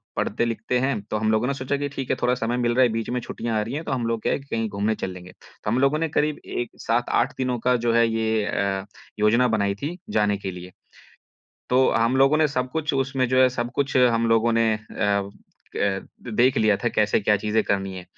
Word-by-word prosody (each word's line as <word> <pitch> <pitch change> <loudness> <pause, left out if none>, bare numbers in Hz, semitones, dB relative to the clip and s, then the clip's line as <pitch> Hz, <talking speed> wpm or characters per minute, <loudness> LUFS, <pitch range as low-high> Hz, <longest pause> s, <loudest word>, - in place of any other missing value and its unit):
पढ़ते-लिखते 120 +2 -1
हैं, 130 -5 0
तो 110 +1 -4
हम 110 0 +1
लोगों 110 +3 +1
ने 140 - 0
सोचा 135 +1 -2
कि 145 0 -2
ठीक 135 -2 -6
है, - - +2
थोड़ा 125 0 +2
समय 120 +1 -2
मिल 120 -1 +1
रहा 130 - +5
है, 120 - +4
बीच 115 +1 -3
में 125 0 -1
छुट्टियाँ 115 -1 -3
आ - - +1
रही 115 +5 -4
हैं, 155 +3 -3
तो - - -5
हम 125 -3 -1
लोग 115 -1 -1
क्या - - 0
है - - -1
कि 135 - -15
कहीं 115 -1 -1
घूमने 105 +2 -1
चल 95 - -4
लेंगे। 90 0 -11 0.3
तो - - -2
हम 120 +4 +1
लोगों 140 +3 +2
ने 165 - 0
करीब 150 0 0
एक, 120 -1 -3
7-8 120 +2 +1
दिनों 125 -2 -1
का 125 +2 +2
जो 115 - +3
है 115 0 +4
ये 110 -1 0
अ, 95 -1 -1 0.3
योजना 115 +4 +4
बनाई 100 -3 0
थी 150 - -5
जाने 105 -1 +1
के 95 -1 -5
लिए। 90 +1 -10 1.0
तो 130 +1 +4
हम 115 +3 +2
लोगों 135 +3 +5
ने 155 - +4
सब 125 -2 -2
कुछ 160 -1 -1
उसमे 135 -1 0
जो 130 +1 +2
है 130 - +6
सब 120 -1 -3
कुछ 140 -2 0
हम 115 -2 +4
लोगों 115 +1 +3
ने 115 -1 +3
अ 100 -2 -2 0.5
अ, 95 -1 0 0.4
देख 125 +2 +4
लिया 105 -2 +3
था 120 - -1
कैसे 105 0 +3
क्या 105 +1 +3
चीज़ें 105 +2 0
करनी 95 -1 -1
है। 90 - -8
115 Hz, 245 wpm, -24 LUFS, 105-130 Hz, 1.0 s, है